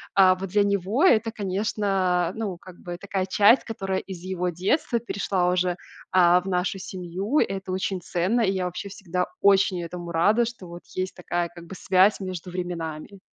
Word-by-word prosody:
э, 185 Hz, -1 st, +6 dB
вот 195 Hz, -1 st, -4 dB
для 205 Hz, +2 st, +3 dB
него 200 Hz, -, 0 dB
это, 225 Hz, -, +4 dB
конечно, 195 Hz, -3 st, 0 dB
ну 205 Hz, -6 st, -3 dB
как 185 Hz, -2 st, -13 dB
бы 175 Hz, -1 st, -6 dB
такая 195 Hz, -1 st, -2 dB
часть, 205 Hz, +6 st, +5 dB
которая 195 Hz, -4 st, -3 dB
из 190 Hz, -3 st, -8 dB
его 180 Hz, 0 st, -2 dB
детства 235 Hz, -, 0 dB
перешла 195 Hz, -5 st, -1 dB
уже, 180 Hz, 0 st, +1 dB
э, -, -, -4 dB, 0.4 s
в 180 Hz, -1 st, +5 dB
нашу 180 Hz, +1 st, 0 dB
семью. 190 Hz, -, -2 dB
Это 190 Hz, -1 st, -1 dB
очень 190 Hz, 0 st, -2 dB
ценно, 185 Hz, +7 st, 0 dB
и 195 Hz, -, +2 dB
я 190 Hz, -2 st, -1 dB
вообще 180 Hz, +3 st, -5 dB
всегда 185 Hz, -2 st, -3 dB, 0.2 s
очень 195 Hz, -2 st, +4 dB
этому 170 Hz, 0 st, -6 dB
рада, 210 Hz, +8 st, +3 dB
что 225 Hz, -6 st, -8 dB
вот 175 Hz, +1 st, -9 dB
есть 185 Hz, 0 st, -3 dB
такая 175 Hz, -1 st, -2 dB
как 170 Hz, -1 st, -12 dB
бы 180 Hz, -, -10 dB
связь 190 Hz, +3 st, +3 dB
между 185 Hz, -2 st, -6 dB
временами. 175 Hz, 0 st, -5 dB
185 Hz, 180 wpm, -25 LUFS, 180-200 Hz, 0.4 s, э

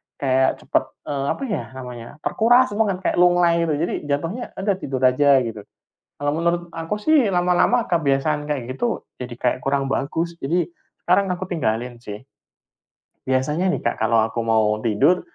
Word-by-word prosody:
kayak 130 Hz, -1 st, +1 dB
cepat, -, -, +1 dB, 0.2 s
e 145 Hz, -, -3 dB
apa 275 Hz, -, -2 dB
ya 220 Hz, -6 st, -2 dB
namanya, 125 Hz, -3 st, -8 dB, 0.2 s
terkuras 245 Hz, +2 st, +3 dB
banget, 205 Hz, -3 st, +1 dB
kayak -, -, +1 dB
lunglai 175 Hz, -1 st, +4 dB
gitu. 155 Hz, -, +1 dB
Jadi 165 Hz, +3 st, -1 dB, 0.2 s
jatuhnya 165 Hz, -, -2 dB
udah 195 Hz, +1 st, 0 dB
tidur 135 Hz, -7 st, -4 dB
aja, 130 Hz, +3 st, +4 dB, 0.2 s
gitu. 110 Hz, -2 st, -6 dB, 0.6 s
Kalau 145 Hz, 0 st, -1 dB
menurut 170 Hz, +1 st, +1 dB
aku 165 Hz, +4 st, -3 dB
sih 290 Hz, -1 st, +4 dB
lama-lama 180 Hz, +7 st, +2 dB
kebiasaan 150 Hz, -2 st, +1 dB
kayak 130 Hz, -3 st, -4 dB
gitu 240 Hz, -1 st, -1 dB, 0.2 s
jadi 125 Hz, -1 st, -6 dB
kayak 125 Hz, -, +1 dB
kurang 135 Hz, 0 st, 0 dB
bagus. 165 Hz, +5 st, -2 dB
Jadi 165 Hz, +3 st, -1 dB, 0.3 s
sekarang 195 Hz, +3 st, +2 dB
aku 185 Hz, +1 st, -6 dB
tinggalin 120 Hz, -6 st, -2 dB
sih. 105 Hz, -3 st, -9 dB, 1.2 s
Biasanya 175 Hz, +7 st, 0 dB
nih, -, -, -8 dB
Kak, -, -, -1 dB
kalau 115 Hz, -2 st, +3 dB
aku 115 Hz, +1 st, -3 dB
mau 110 Hz, -2 st, +2 dB
tidur, 125 Hz, -, +2 dB
150 Hz, 160 wpm, -22 LUFS, 130-180 Hz, 1.2 s, lunglai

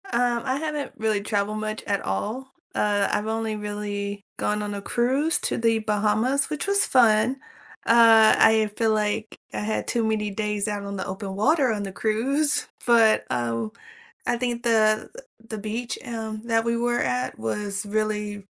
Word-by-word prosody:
Um, 245 Hz, -8 st, 0 dB
I 260 Hz, 0 st, 0 dB
haven't 300 Hz, -1 st, -4 dB
really 215 Hz, -2 st, 0 dB
traveled 210 Hz, 0 st, -1 dB
much 215 Hz, 0 st, -4 dB
at 200 Hz, -2 st, -1 dB
all. 225 Hz, -, -3 dB, 0.2 s
Uh, 205 Hz, -1 st, +2 dB
I've 210 Hz, +1 st, -1 dB
only 220 Hz, 0 st, -2 dB
really 205 Hz, -1 st, -4 dB
gone 210 Hz, 0 st, -1 dB
on 205 Hz, 0 st, -4 dB
a 200 Hz, -, -5 dB
cruise 260 Hz, +9 st, +1 dB
to -, -, -2 dB
the 230 Hz, -1 st, +2 dB
Bahamas, 215 Hz, +5 st, +1 dB
which 300 Hz, +3 st, -3 dB
was 400 Hz, 0 st, +3 dB
fun. 240 Hz, +1 st, +4 dB, 0.5 s
Uh, 225 Hz, -1 st, +7 dB
I 220 Hz, -1 st, +5 dB
feel, 225 Hz, -1 st, +2 dB
like, 215 Hz, +1 st, -1 dB, 0.2 s
I -, -, -2 dB
had 215 Hz, +1 st, -2 dB
too 235 Hz, -, 0 dB
many 215 Hz, -1 st, 0 dB
days 210 Hz, 0 st, -2 dB
out 205 Hz, -1 st, -3 dB
on 200 Hz, 0 st, -5 dB
the -, -, -3 dB
open 190 Hz, 0 st, -5 dB
water 265 Hz, +4 st, +3 dB
on 210 Hz, -2 st, -2 dB
the 195 Hz, -, -5 dB
cruise, 265 Hz, +9 st, 0 dB, 0.2 s
but, 230 Hz, -3 st, +4 dB
oh, 120 Hz, -, -2 dB, 0.5 s
I -, -, +1 dB
think 240 Hz, -1 st, -2 dB
the 220 Hz, -2 st, +2 dB, 0.4 s
the 220 Hz, -, -5 dB
beach, 220 Hz, +3 st, -4 dB
um, 220 Hz, -2 st, -5 dB
that 225 Hz, -1 st, +1 dB
we 235 Hz, 0 st, 0 dB
were 240 Hz, +1 st, 0 dB
at 125 Hz, 0 st, -1 dB
was 200 Hz, -, -3 dB
really 210 Hz, -1 st, -2 dB
215 Hz, 170 wpm, -24 LUFS, 205-235 Hz, 0.5 s, Uh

